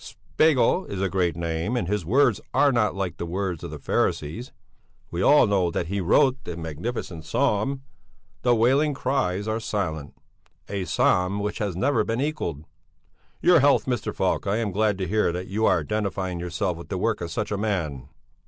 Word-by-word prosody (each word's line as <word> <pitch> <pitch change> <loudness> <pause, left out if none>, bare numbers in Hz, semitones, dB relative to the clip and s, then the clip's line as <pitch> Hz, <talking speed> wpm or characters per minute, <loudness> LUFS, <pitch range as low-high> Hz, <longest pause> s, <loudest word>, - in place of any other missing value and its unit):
"Spegel 155 +3 +1
is 100 - -5
a 95 0 0
great 90 -4 0
name, 85 +7 -2
and 105 - -1
his 105 -1 -1
words 130 - +3
are 145 - +5
not 115 -5 +1
like 95 -4 -3
the - - -4
words 90 -1 -3
of - - -5
the - - -7
Pharisees. 110 - -1 0.6
We 85 - -2
all 145 +9 +6
know 100 -4 +2
that 85 0 -3
he 100 0 -1
wrote 130 +9 +3
the 85 - -6
magnificent 80 - -5
psalm, 135 - 0 0.6
'The 120 -1 +3
wailing 135 +6 +3
cries 120 -8 -1
are 110 +1 -1
silent,' 80 -10 -3 0.5
a 100 -2 -3
psalm 90 +2 +2
which 105 0 -3
has 100 -5 -2
never 110 +4 +2
been 115 +2 -2
equalled. 130 - -3 0.8
Your 175 -1 +6
health, 140 +1 +4
Mr. 125 -4 -2
Falk! - - -1
I 100 +2 +1
am 110 -3 -1
glad 105 +1 +1
to 95 -1 -3
hear 105 -1 +1
that 90 +1 -4
you 110 +3 +1
are 85 - +3
identifying 95 0 -2
yourself 90 +1 -2
with 85 - -11
the 95 - -2
work 110 +2 0
of 85 - -4
such 105 +6 -3
a - - 0
man." 85 - -2
100 Hz, 190 wpm, -25 LUFS, 90-115 Hz, 0.8 s, all